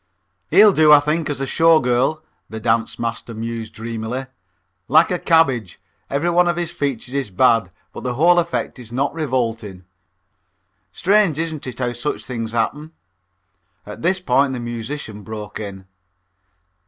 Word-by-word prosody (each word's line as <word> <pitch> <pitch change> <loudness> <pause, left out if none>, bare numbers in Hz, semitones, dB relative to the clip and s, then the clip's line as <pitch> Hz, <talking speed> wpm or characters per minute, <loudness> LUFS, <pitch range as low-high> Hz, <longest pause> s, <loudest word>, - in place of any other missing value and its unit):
"He'll 200 +4 +7
do, 155 -2 +5
I 150 - +9
think, 155 +2 -1
as 145 - -3
a 135 - -1
Show 165 +3 +4
Girl," 130 +5 0 0.3
the 110 - -6
dance 115 0 0
master 115 0 -4
mused 115 0 -5
dreamily. 115 +3 -4 0.6
"Like 160 +7 +4
a 180 - 0
cabbage, 135 - +2 0.3
every 155 +5 0
one 175 +1 +4
of 175 - +1
his 170 -1 -3
features 135 -6 -3
is 140 -5 -2
bad, 110 0 +3 0.2
but - - -8
the 125 -1 -3
whole 175 +6 +5
effect 170 -5 -3
is 115 -2 -11
not 135 +4 -1
revolting. 115 - -3 1.1
Strange, 195 -4 +2
isn't 160 -3 -4
it, 125 - -7
how 125 -1 -2
such 120 +5 -4
things 115 -3 -5
happen." 150 +7 -2 0.9
At 105 - -9
this 185 +3 +1
point 140 -4 +2
the 125 - -4
musician 120 -1 -6
broke 105 0 -7
in. 100 -3 -7
130 Hz, 155 wpm, -20 LUFS, 115-160 Hz, 1.1 s, I